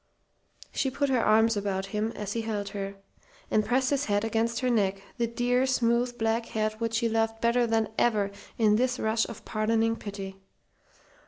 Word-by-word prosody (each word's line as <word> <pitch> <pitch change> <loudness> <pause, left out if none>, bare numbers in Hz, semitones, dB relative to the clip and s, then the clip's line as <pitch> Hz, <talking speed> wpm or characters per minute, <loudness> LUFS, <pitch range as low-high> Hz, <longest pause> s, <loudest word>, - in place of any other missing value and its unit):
She 270 - 0
put 280 +2 -1
her 255 -3 +2
arms 220 +1 +4
around 195 -2 -1
him 210 +3 -2
as 205 -1 -4
he 230 - -1
held 210 -3 -3
her, 200 -1 -5 0.6
and 215 - +3
pressed 255 +5 +1
his 285 0 +1
head 205 0 +1
against 230 +2 0
her 255 - +1
neck 195 -4 +1 0.2
the 235 - +2
dear, 245 +2 +1
smooth 240 -1 +1
black 225 0 0
head 215 0 -1
which 230 -1 -1
she 230 0 +2
loved 225 0 0
better 235 +1 +2
than 225 -1 +1
ever 210 -4 +2 0.3
in 215 -2 +4
this 250 +1 +1
rush 220 +1 0
of 230 - -10
pardoning 225 +1 +1
pity. 195 -2 -7
225 Hz, 180 wpm, -28 LUFS, 210-235 Hz, 0.6 s, arms